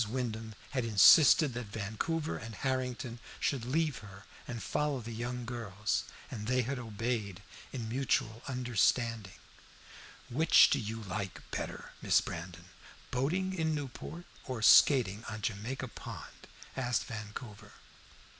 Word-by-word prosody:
Wyndham 110 -3 -3 0.2
had 130 -4 0
insisted 130 +6 +7
that 120 -2 -5
Vancouver 110 +11 -2
and 110 -1 -7
Harrington 125 -2 -2 0.2
should 130 -5 0
leave 150 +1 0
her 100 -1 -12 0.2
and 115 -3 -5
follow 150 -2 0
the 115 0 -7
young 120 +2 -4
girls, 110 -3 -2 0.3
and 105 0 -5
they 125 0 +2
had 130 +2 -3
obeyed 110 -4 -3 0.3
in 120 -4 -4
mutual 115 -2 0
understanding. 115 -4 0 0.9
"Which 160 +7 +6
do - - +3
you 110 +1 -5
like 100 -1 -4
better, - - -5
Miss - - +4
Brandon, 85 +1 -7 0.5
boating 175 +9 0
in 160 -3 0
Newport 150 +4 -6 0.2
or 125 -4 -4
skating 110 -5 +6
on 105 -1 -6
Jamaica 115 +6 -3
Pond?" - - -10 0.3
asked 125 -2 0
Vancouver. 110 0 -8
120 Hz, 125 wpm, -32 LUFS, 110-130 Hz, 0.9 s, insisted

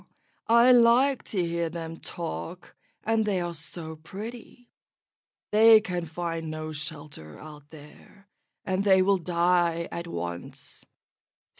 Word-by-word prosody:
I 235 +2 +6
like 245 +3 +5
to 180 -5 -1
hear 170 0 -1
them 165 0 -6
talk, 170 +1 -6 0.3
and 225 0 +1
they 205 -3 0
are 175 -1 -3
so 160 0 -3
pretty; 225 +8 -10 0.8
they 220 +1 +8
can 180 -5 -4
find 165 0 -4
no 155 0 -5
shelter 150 - -7
out 150 -1 -13
there, 160 +6 -16 0.4
and 190 0 0
they 190 -2 +5
will 195 0 +2
die 170 -1 +1
at 170 0 -5
once. 85 - -6
175 Hz, 125 wpm, -27 LUFS, 160-205 Hz, 0.8 s, they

